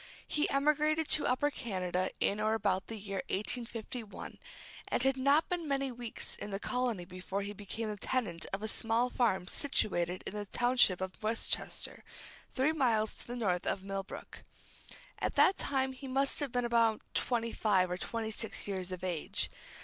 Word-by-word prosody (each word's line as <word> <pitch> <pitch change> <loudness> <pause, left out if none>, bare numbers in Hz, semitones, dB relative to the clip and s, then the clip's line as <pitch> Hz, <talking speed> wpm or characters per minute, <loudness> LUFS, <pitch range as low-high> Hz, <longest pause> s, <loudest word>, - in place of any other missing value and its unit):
He 300 - +1
emigrated 300 +2 +3
to 305 - +5
Upper 290 +4 +2
Canada 185 -6 -1
in 205 - +2
or 215 +1 +2
about 195 -3 +1
the 225 - -5
year 195 -2 -3
1851, 230 +1 -3 0.5
and - - +2
had 270 0 +4
not 280 +4 +4
been 350 -3 -2
many 275 -1 +1
weeks 240 -2 -4
in - - -6
the 195 -1 -3
colony 245 -6 -1
before 185 +2 -4
he 205 +1 -4
became 210 +2 -4
the 210 -1 -3
tenant 200 -6 -1
of 195 +2 -3
a - - 0
small 230 +3 +1
farm 190 -7 +2
situated 180 -6 0
in - - -4
the 205 -1 -4
township 240 -6 +3
of 190 +2 -4
Westchester, 220 +1 -1 0.5
three 270 +4 +2
miles 235 -8 +2
to - - -9
the 240 - -4
north 190 -7 0
of 190 - 0
Millbrook. 195 0 -6 0.8
At - - -1
that 385 - +6
time 265 -1 +1
he 265 +1 -8
must 270 +1 +1
have 285 -4 -1
been 245 0 +1
about 230 -2 +3
twenty 230 -2 0
five 190 -5 +2
or 180 - -1
twenty 225 +1 -3
six 220 -1 -3
years 190 -2 -3
of 185 0 -5
age. 175 -4 -2
225 Hz, 175 wpm, -33 LUFS, 195-255 Hz, 0.8 s, that